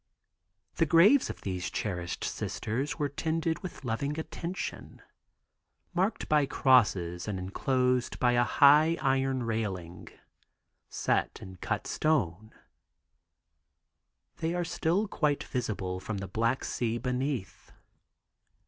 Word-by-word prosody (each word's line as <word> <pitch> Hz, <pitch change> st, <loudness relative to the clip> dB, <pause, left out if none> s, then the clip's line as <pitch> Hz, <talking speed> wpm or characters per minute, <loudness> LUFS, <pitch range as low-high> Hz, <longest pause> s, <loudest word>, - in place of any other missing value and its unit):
The 165 Hz, -, +3 dB
graves 195 Hz, -, +6 dB
of -, -, -7 dB
these 90 Hz, -1 st, -3 dB
cherished 90 Hz, -2 st, -3 dB
Sisters 130 Hz, +7 st, -3 dB
were 150 Hz, -3 st, 0 dB
tended 160 Hz, +3 st, -1 dB
with 185 Hz, -6 st, -8 dB
loving 140 Hz, +6 st, -2 dB
attention. 170 Hz, +3 st, -6 dB, 0.9 s
Marked 190 Hz, +5 st, 0 dB
by 150 Hz, -2 st, +3 dB
crosses 95 Hz, -12 st, +2 dB
and 105 Hz, -3 st, -2 dB
enclosed 125 Hz, +6 st, 0 dB
by 125 Hz, -, +3 dB
a 120 Hz, 0 st, +3 dB
high 150 Hz, +8 st, +5 dB
iron 135 Hz, -1 st, +1 dB
railing 100 Hz, -7 st, -4 dB, 0.8 s
set -, -, 0 dB
in 95 Hz, -1 st, -10 dB
cut -, -, -3 dB
stone, 110 Hz, -, 0 dB, 1.9 s
they 165 Hz, +2 st, -1 dB
are 175 Hz, -1 st, -1 dB
still 175 Hz, +5 st, 0 dB
quite 150 Hz, -6 st, 0 dB
visible 100 Hz, -7 st, -3 dB
from 105 Hz, +2 st, -4 dB
the 100 Hz, 0 st, -5 dB
Black 115 Hz, +6 st, 0 dB
Sea 115 Hz, -1 st, -1 dB
beneath. 125 Hz, -3 st, -3 dB
125 Hz, 110 wpm, -29 LUFS, 100-155 Hz, 1.9 s, graves